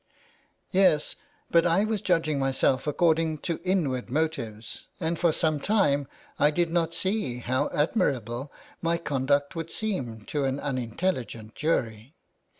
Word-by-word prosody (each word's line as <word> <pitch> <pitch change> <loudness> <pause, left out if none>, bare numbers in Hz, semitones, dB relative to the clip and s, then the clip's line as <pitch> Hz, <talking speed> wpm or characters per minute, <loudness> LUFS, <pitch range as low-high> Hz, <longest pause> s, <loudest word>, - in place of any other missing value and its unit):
" - - -36 0.3
Yes, 185 -6 +3 0.4
but 170 0 +5
I 180 +5 +3
was 215 -2 -1
judging 165 -5 +1
myself 135 0 +1
according 160 +1 +2
to 165 -3 -1
inward 150 -11 0
motives, 120 -7 -3
and 165 -1 -1
for 170 -2 +4
some 155 -1 +1
time 145 -7 +2 0.3
I 145 - +6
did 170 +2 0
not 170 -1 +1
see 190 - -1
how 125 +1 0
admir 150 0 +2
able 120 +4 -6 0.3
my 165 0 +1
conduct 140 -2 0
would 165 0 -4
seem 135 - -3
to 140 +6 -2
an 135 +1 -1
unintelligent 125 -4 -2
jury. 125 -4 -1
150 Hz, 145 wpm, -27 LUFS, 130-170 Hz, 0.4 s, I